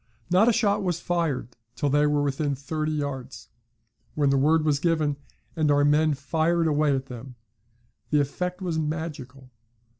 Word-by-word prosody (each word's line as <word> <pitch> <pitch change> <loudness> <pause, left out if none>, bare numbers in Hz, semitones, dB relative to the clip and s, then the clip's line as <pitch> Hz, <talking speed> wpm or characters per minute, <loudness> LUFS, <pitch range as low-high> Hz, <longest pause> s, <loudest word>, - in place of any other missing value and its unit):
Not 200 +6 +5
a - - +5
shot 205 -2 +1
was 175 -3 -1
fired 165 -10 -1 0.3
till 145 +3 -1
they 145 +1 +3
were 145 -1 +1
within 140 0 -1
thirty 155 +3 -3
yards, 140 -4 -5 0.7
when 145 -2 +2
the - - +3
word 155 +3 +3
was 145 -2 +2
given, 155 -3 +1 0.4
and 155 -2 +1
our 145 0 +4
men 150 +1 +3
fired 160 +4 0
away 150 -2 +2
at 135 0 -3
them. 125 0 -10 0.7
The 150 - +3
effect 180 +6 -2
was 170 -3 -1
magical. 150 -5 -5
150 Hz, 160 wpm, -25 LUFS, 140-165 Hz, 0.7 s, Not